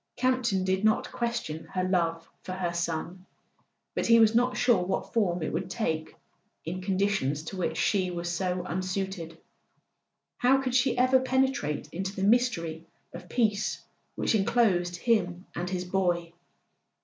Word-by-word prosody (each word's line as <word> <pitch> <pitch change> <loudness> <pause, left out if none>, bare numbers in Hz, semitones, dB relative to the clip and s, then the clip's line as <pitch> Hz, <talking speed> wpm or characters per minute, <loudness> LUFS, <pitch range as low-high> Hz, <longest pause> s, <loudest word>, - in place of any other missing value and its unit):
Campton 250 -7 +1
did 190 +1 0
not 220 0 +2
question 235 -10 -3
her 185 - -3
love 165 -3 0
for 185 - -6
her 180 -2 -2
son; 170 +2 -3 0.7
but - - -1
he 230 0 +7
was 220 -1 +6
not 245 +2 +2
sure 240 -7 +3
what 190 +2 -3
form 180 -7 +1
it - - -3
would 180 +3 -2
take 160 -7 -2 0.5
in 180 +3 -4
conditions 185 -7 0
to 160 - -7
which 160 -3 -1
she 190 -3 +1
was 175 -1 -4
so 180 +1 -1
unsuited. 185 -2 -3 1.0
How 255 +2 +4
could 260 -2 -2
she 255 0 +2
ever 255 +1 +5
penetrate 260 - 0
into 190 +3 -4
the 190 - -3
mystery 195 -8 +1 0.3
of 175 +1 -10
peace 215 -4 0 0.3
which - - 0
enclosed 195 -5 +2
him 180 -3 0
and 175 +1 -3
his 180 -1 -3
boy 175 -2 0
185 Hz, 150 wpm, -28 LUFS, 175-230 Hz, 1.0 s, he